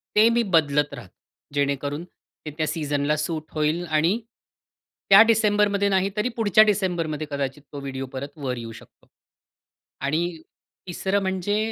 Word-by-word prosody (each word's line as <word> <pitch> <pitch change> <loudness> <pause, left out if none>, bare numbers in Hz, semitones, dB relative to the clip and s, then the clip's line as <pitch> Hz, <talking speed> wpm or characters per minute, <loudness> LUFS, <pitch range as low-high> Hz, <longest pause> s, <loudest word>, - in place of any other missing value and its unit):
ते 215 +2 +6
मी 235 0 +2
बदलत 145 -1 +1
राहतो, 120 -9 -10 0.4
जेणेकरून 145 +2 -1 0.4
ते 150 - -5
त्या 155 -1 0
सीझनला 150 -1 -1
सूट 155 0 -4
होईल 155 +3 0
आणि 165 +7 +1 0.9
त्या 195 +2 +10
डिसेंबरमध्ये 210 -2 +2
नाही, 190 0 +2
तरी 240 +4 +1
पुढच्या 215 -1 +5
डिसेंबरमध्ये 175 -7 -1
कदाचित 140 0 -3
तो 140 - -5
व्हिडिओ 135 -1 -5
परत 140 +3 -7
वर 130 -4 -3
येऊ 115 -1 -7
शकतो. - - -16 0.9
आणि 160 +3 -1 0.5
तिसरं 190 +3 -1
म्हणजे 190 +2 -1
155 Hz, 140 wpm, -24 LUFS, 145-200 Hz, 0.9 s, त्या